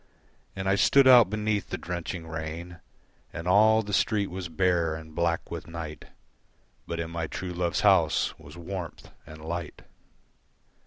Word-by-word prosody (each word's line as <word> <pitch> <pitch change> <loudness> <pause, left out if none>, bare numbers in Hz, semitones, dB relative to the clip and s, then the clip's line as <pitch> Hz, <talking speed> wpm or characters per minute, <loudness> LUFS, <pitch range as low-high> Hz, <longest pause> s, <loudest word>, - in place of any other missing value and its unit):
And 95 0 -4
I 95 - +3
stood 135 +7 +5
out 120 -6 +8
beneath 105 -1 -1
the - - -3
drenching 85 -1 -5
rain 80 +2 -6 0.5
And 80 +2 -6
all 110 +4 +5
the 105 0 -6
street 105 -1 +1
was 90 -1 -5
bare, 85 -2 +1
and 80 -1 -10
black 85 0 -1
with - - -6
night, 80 -2 -7 0.8
But 85 - -4
in 85 0 -4
my 85 -1 -3
true 90 +2 -5
love's 85 0 -1
house - - +3
was 75 +4 -13
warmth 85 -2 -7 0.2
and 80 0 -11
light. 85 -1 -5
85 Hz, 155 wpm, -27 LUFS, 80-95 Hz, 0.8 s, out